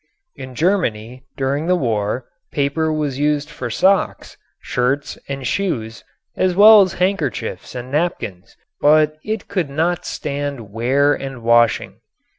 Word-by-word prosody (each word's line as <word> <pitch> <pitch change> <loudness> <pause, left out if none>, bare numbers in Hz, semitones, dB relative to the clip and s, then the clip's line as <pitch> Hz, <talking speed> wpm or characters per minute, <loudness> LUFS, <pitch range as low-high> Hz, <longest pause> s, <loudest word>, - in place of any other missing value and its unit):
In 130 -1 -9
Germany 130 - -1
during 140 +4 -1
the 180 - +3
war 115 - -1 0.3
paper 150 +3 0
was 150 -3 -2
used 150 +1 0
for 130 -5 -5
socks, 190 - +1 0.2
shirts 135 +3 -1
and 135 -1 -4
shoes 115 - -2 0.3
as 185 -1 +1
well 210 +2 +9
as 185 -2 +1
handkerchiefs 180 - -2
and 125 +1 -6
napkins 130 - -3 0.2
but 155 +1 +4
it 220 -1 -4
could 180 -7 -2
not 165 +5 -1
stand 140 -7 -5
wear 135 +6 +2
and 135 -4 -6
washing. 115 0 +2
140 Hz, 130 wpm, -19 LUFS, 125-165 Hz, 0.3 s, well